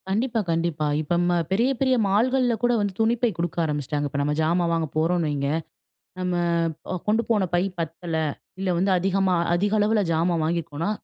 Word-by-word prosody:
கண்டிப்பா, 230 +4 0
கண்டிப்பா. 165 -2 -1 0.2
இப்ப 155 +3 -1
ம் 175 - +2 0.2
பெரிய, 235 +7 +2
பெரிய 260 -1 +3
மால்கள்ல 245 +5 +2
கூட 245 - +4
வந்து 205 -2 -1
துணிப்பை 235 +2 +2
கொடுக்க 170 0 -3
ஆரம்பிச்சுட்டாங்க. 145 -1 -2
இப்ப 140 - -3
நம்ம 145 +1 0
ஜாமா 170 +3 +2
வாங்க 165 -1 0
போறோம் 170 +2 +2
வைங்க, 140 -2 -1 0.7
நம்ம 180 0 -1 0.6
அ - - -1
கொண்டு 220 +2 +3
போன 205 -5 +2
பை 175 - +3 0.2
பத்தல 165 +1 -4 0.4
இல்ல, 190 - -1
வந்து 190 +3 +1
அதிகமா 190 0 +1 0.2
அதிக 205 +4 +1
அளவுல 210 +1 +2
ஜாமான் 165 0 +1
வாங்கியிருக்கோனா, 165 +1 -2
180 Hz, 170 wpm, -24 LUFS, 165-210 Hz, 0.7 s, கூட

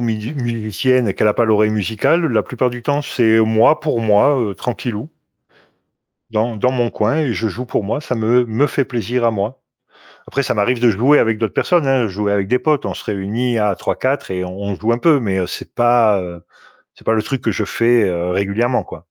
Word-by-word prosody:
mid 115 +3 -3
musicienne 120 +2 0
et 100 - 0
qu'elle 105 - +2
a 105 - +2
pas 120 - +2
l'oreille 110 -1 +3
musicale, 110 - 0
la 115 -8 +1
plupart 125 0 -1
du 120 0 -8
temps, 145 +2 0
c'est 115 -5 +2
moi 110 +7 +4
pour 150 -6 -1
moi, 110 +6 +3
heu, 105 -4 -2
tranquillou 120 +2 -5 1.2
dans 110 +1 -1
dans 125 +5 +1
mon 120 -2 -1
coin 110 +7 0
et 150 -7 0
je 110 0 -2
joue 125 +6 -6
pour 115 - -1
moi, 125 +8 -2
ça 130 - -4
me 120 +2 +2
me 115 +6 +1
fait 140 - 0
plaisir 120 0 -2
à 115 - +3
moi. 105 +5 -3 0.7
Après, 140 - -2
ça - - -1
m'arrive 115 +4 0
de 120 -2 +4
jouer 130 +9 +3
avec 110 -1 +1
d'autres 110 -2 -2
personnes, 175 -5 +1
hein, 130 -5 +2
jouer 100 +1 -2
avec 100 -1 0
des 125 +1 +2
potes, 150 -2 0
on - - -3
se - - -9
réunit 110 +4 -2
à 105 -2 +1
3-4 130 -5 -2
et 90 0 -3
on 100 +2 -5
joue 110 +4 -1
un 120 - 0
peu, 150 -1 +3
mais 95 -4 -1
c'est - - -8
pas, 120 -4 +3
heu, 85 -1 -8 0.5
c'est - - -21
pas 110 - +2
le 110 -1 0
truc 130 +2 -3
que 110 - 0
je 105 - -2
fais, 115 +2 +2
heu, 90 -2 -1
régulièrement, 100 +6 0
quoi. - - -10
115 Hz, 225 wpm, -18 LUFS, 105-125 Hz, 1.2 s, moi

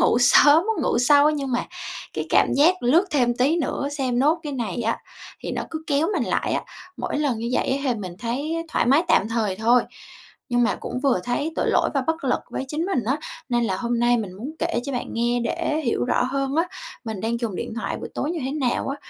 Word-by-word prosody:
ngủ - - +4
sớm, 295 +6 +7
muốn 440 -9 0
ngủ 240 - +1
sâu 285 +4 +5
nhưng 280 -4 -3
mà 245 - 0 0.5
cái - - -3
cảm - - +4
giác 335 +5 +4
lướt 310 +10 +4
thêm 245 -4 +2
tí 280 +7 +2
nữa 285 -3 -1
xem 260 -4 -1
nốt 305 +6 +3
cái 295 - -5
này 240 -3 -3
á, - - 0 0.4
thì - - -5
nó - - -2
cứ 315 -1 -5
kéo 290 +2 +1
mình 285 -10 0
lại - - -1
á. - - 0 0.3
Mỗi - - -3
lần 275 -7 0
như 230 - -3
vậy - - +1
á 270 - +2
hì - - +1
mình 185 -4 -7
thấy 285 +9 -2
thoải 315 - 0
mái 275 +6 +5
tạm 220 -9 +3
thời 220 -5 -1
thôi 235 +3 +4 0.7
nhưng 245 0 +2
mà 235 - +1
cũng 250 - -4
vừa 265 -10 +2
thấy 290 +6 -1
tội - - +1
lỗi - - +2
và 275 - +2
bất 320 -2 -1
lực 255 - +1
với - - -3
chính 310 +5 -2
mình 260 - 0
á, 260 +6 +1 0.3
nên 240 -1 +1
là 190 -4 0
hôm 235 +3 -1
nay 240 0 +4
mình 205 -5 -4
muốn 230 +10 -6
kể 235 - 0
cho 280 - -4
bạn 245 - -2
nghe 240 +1 0
để 315 +3 -1
hiểu 235 - 0
rõ 245 - +1
hơn 275 +2 -1
á, 330 - +3 0.4
mình 220 -4 -5
đang 230 +1 -2
dùng 220 -6 -3
điện - - -4
thoại 235 - -3
buổi - - -6
tối 300 - -2
như 345 - -3
thế 265 - -2
nào 270 -3 -1
á, 275 - -2
255 Hz, 250 wpm, -23 LUFS, 235-300 Hz, 0.7 s, sớm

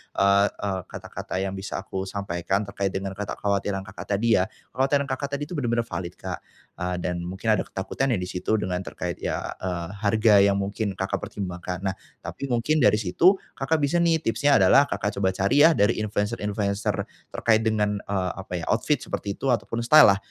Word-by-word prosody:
eee 100 +1 +4
eee, 95 -2 -3
kata-kata 95 - -6
yang 95 0 -2
bisa 95 +1 -4
aku 95 0 -4
sampaikan 95 0 -2
terkait 100 -1 -2
dengan 95 0 -3
kekhawatiran 100 -1 -2
Kakak, 95 - -8
tadi 115 +1 +3
ya 90 - +3 0.3
kekhawatiran 140 +2 +2
Kakak, 135 +1 -2
tadi 145 - -4
itu - - -8
bener-bener 120 -4 0
valid 85 0 -5
Kak, - - -5 0.4
eee, 90 0 -1
dan 90 -1 -2
mungkin 95 +5 -6
ada - - -1
ketakutan 130 +8 -2
ya 110 - +1
di 90 - -4
situ 90 +4 -1
dengan 90 -2 -2
terkait - - -4
ya, - - -1 0.2
eee, 90 -3 -2
harga 105 +1 +3
yang 100 0 +3
mungkin 100 +1 -2
Kakak, 95 +1 -1
pertimbangkan. 90 -2 -5
Nah 95 - 0 0.3
tapi 140 - -6
mungkin 135 +6 +2
dari 105 - +5
situ 170 - +4 0.2
Kakak 150 +4 0
bisa 145 +3 0
nih 165 -1 +3
tipsnya 145 +1 +3
adalah 140 - +6
Kakak, 100 +1 -2
coba 95 -1 +1
cari 100 +11 +3
ya 165 - +8
dari 110 -6 +2
influencer-influencer 105 -1 -1 0.3
terkait 110 -1 +2
dengan, 105 -2 +1
eee, 95 -2 -1
apa 95 - -10
ya 85 - -5
outfit 135 +6 +1
seperti 100 -1 -4
itu 135 - -3
ataupun 115 0 -2
style-lah 120 -8 +8
100 Hz, 185 wpm, -25 LUFS, 95-115 Hz, 0.4 s, ya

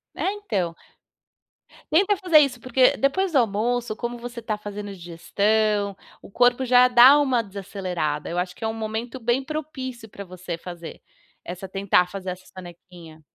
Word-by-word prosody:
É, 390 - -1
então 200 - -2 1.2
tenta 395 +5 +4
fazer 360 -5 +5
isso, 270 -4 +1
porque 255 0 +3
depois 360 +7 0
do 280 - +4
almoço, 235 +1 -1
como 240 0 -4
você 235 0 -8
tá 215 -1 -3
fazendo 205 -1 -7
a - - -7
digestão, 200 +4 0 0.3
o - - -14
corpo 245 +3 +3
já 250 0 +6
dá 250 +4 +8
uma 260 -5 +2
desacelerada. 185 -7 -4
Eu 170 - -4
acho 180 0 -3
que - - -11
é - - 0
um 220 - -2
momento 225 +3 -5
bem 240 +3 0
propício 260 -6 -6
pra 200 -1 -9
você 180 -2 -7
fazer 170 -1 -9 0.4
essa 180 +2 -7
tentar 190 -2 +2
fazer 190 -2 -6
essa 185 +1 -7
sonequinha. 175 -3 -13
220 Hz, 165 wpm, -24 LUFS, 185-250 Hz, 1.2 s, dá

